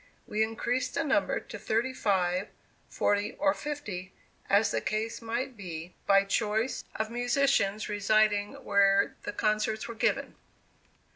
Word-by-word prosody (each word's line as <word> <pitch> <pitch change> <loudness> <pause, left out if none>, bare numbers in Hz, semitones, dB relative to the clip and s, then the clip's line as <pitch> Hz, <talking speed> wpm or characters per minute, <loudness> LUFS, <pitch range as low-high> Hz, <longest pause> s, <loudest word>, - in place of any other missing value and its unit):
We 215 - -1
increased 240 +4 -1
the 280 - +1
number 300 0 +1
to - - -9
thirty 235 +4 0
five, 185 -4 +1 0.4
forty 205 0 0
or 290 -1 +2
fifty, 210 - -5 0.4
as 205 +1 +4
the - - 0
case 215 +4 -2
might 240 +3 -3
be, 175 -4 -7
by 195 0 +6
choice 215 +4 0
of 220 0 -2
musicians 245 -4 +1
residing 210 +1 +2
where 200 -1 +4
the - - -2
concerts 215 +1 0
were 235 - -5
given. 225 - 0
215 Hz, 135 wpm, -29 LUFS, 200-240 Hz, 0.4 s, by